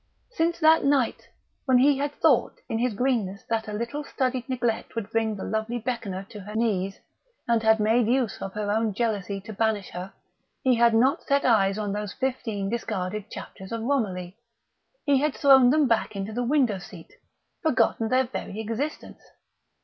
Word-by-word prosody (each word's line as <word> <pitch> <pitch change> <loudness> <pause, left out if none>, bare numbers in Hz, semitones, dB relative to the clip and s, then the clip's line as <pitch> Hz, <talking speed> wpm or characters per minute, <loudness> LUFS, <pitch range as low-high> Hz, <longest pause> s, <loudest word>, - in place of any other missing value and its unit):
Since 340 -5 0
that 315 +1 +6
night 275 -4 +1 0.4
when 260 -2 +4
he 275 +2 +4
had 285 +1 -1
thought - - +2
in 225 - -2
his 240 -2 0
greenness 215 -5 -1
that 220 -1 0
a - - -5
little 235 +7 -3
studied 255 -2 -2
neglect 240 -4 -2
would 225 -2 -4
bring 225 -1 0
the 195 - -6
lovely 220 +2 -2
Beckoner 225 -5 -4
to 210 - -8
her 210 +2 -9
knees, 195 -4 0 0.5
and 235 -1 +2
had 220 0 +4
made 220 +2 +3
use 245 -3 0
of 195 - -5
her 210 -1 -2
own 220 -1 0
jealousy 205 -4 -1
to 220 +2 -9
banish 215 -2 -1
her, 180 +2 -6 0.5
he 260 - +4
had 235 -1 +4
not 255 +5 +3
set 280 0 +1
eyes 200 -4 +3
on 205 -2 -2
those 210 -1 -4
fifteen 225 -6 -2
discarded 210 -2 -3
chapters 190 0 -9
of 230 -1 -3
Romilly. 205 -7 -2 0.7
He 280 -3 +4
had 295 0 0
thrown 265 -3 +6
them 300 +1 +3
back 230 -2 0
into 200 +2 -4
the 245 +2 -1
window 245 -6 +2
seat, 175 -2 -12 0.5
forgotten 245 -7 +2
their 260 +1 +3
very 220 -4 -6
existence. 230 +8 -4
225 Hz, 180 wpm, -26 LUFS, 205-255 Hz, 0.7 s, that